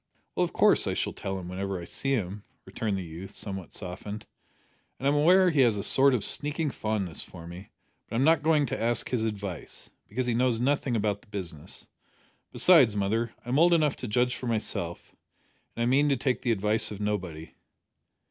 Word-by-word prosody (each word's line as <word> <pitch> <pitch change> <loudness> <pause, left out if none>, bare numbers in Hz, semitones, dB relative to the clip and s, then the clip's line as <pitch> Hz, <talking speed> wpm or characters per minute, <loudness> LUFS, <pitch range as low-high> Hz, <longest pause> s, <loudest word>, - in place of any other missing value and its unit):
"Well, - - +1
of - - -1
course - - +4
I - - -1
shall - - -1
tell 95 0 -4
him 90 -2 -7
whenever 95 +1 -3
I 85 - -7
see 135 +9 -1
him," 100 -4 -2 0.2
returned 105 -3 -2
the 95 - -4
youth, 90 +4 -9
somewhat 95 -4 -5
softened; 100 +3 -6 0.7
"and 135 - -2
I'm 140 - +4
aware 180 +5 +5
he 150 -4 +3
has 115 -5 +4
a 100 - -2
sort 135 +4 +5
of 110 - -2
sneaking 150 0 0
fondness 105 -8 -2
for 85 -2 -10
me; 90 +3 -10 0.4
but - - -5
I'm 125 - +2
not 160 0 +4
going 155 -1 +3
to 120 - -4
ask 120 0 +1
his 125 -3 +1
advice, 100 -7 -5 0.2
because 125 +4 -2
he 120 - 0
knows 120 -1 +2
nothing 135 -1 +1
about 105 -2 0
the - - -23
business. 90 -7 -5 0.7
Besides, 140 - +5
mother, 110 +3 0
I - - -7
am 135 +4 +2
old 170 +1 +6
enough 150 -3 +2
to 125 - -5
judge 125 +3 +1
for 125 - -5
myself, 115 -2 -2 0.6
and 115 0 0
mean 140 +4 +3
to 140 - +2
take 130 +1 -1
the 120 - +1
advice 110 +1 +2
of 105 - -7
nobody." 90 -6 -3
110 Hz, 200 wpm, -28 LUFS, 100-135 Hz, 0.7 s, old